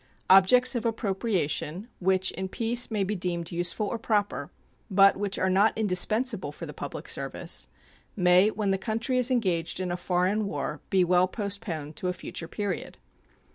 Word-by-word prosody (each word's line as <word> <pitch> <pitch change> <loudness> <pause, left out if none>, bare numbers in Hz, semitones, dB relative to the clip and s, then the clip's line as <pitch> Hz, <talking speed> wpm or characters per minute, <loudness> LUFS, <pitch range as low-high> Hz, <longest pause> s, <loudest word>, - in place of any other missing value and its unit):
Objects 195 +8 +6
of 240 -3 -2
appropriation 195 - -2
which 190 +1 +2
in 190 0 -5
peace 235 +4 +1
may 215 -3 0
be 205 +2 -2
deemed 175 -2 -3
useful 175 +5 0
or 225 - -3
proper, 210 -2 -1 0.4
but 195 0 +5
which 200 0 -2
are 185 - +1
not 195 +4 +3
indispensable 215 - +1
for - - -8
the - - -8
public - - -7
service, - - -3 0.5
may 180 +1 +5
when 210 -2 -1
the 195 - 0
country 230 +4 -1
is 250 0 +2
engaged 185 -10 0
in 185 -1 -2
a - - -1
foreign 185 +4 0
war 150 -2 -4
be 190 -1 +3
well 180 +1 +3
postponed 185 -7 -4
to 185 - -3
a 180 - 0
future 175 -2 -7
period. 205 -1 -4
195 Hz, 170 wpm, -27 LUFS, 180-215 Hz, 0.5 s, Objects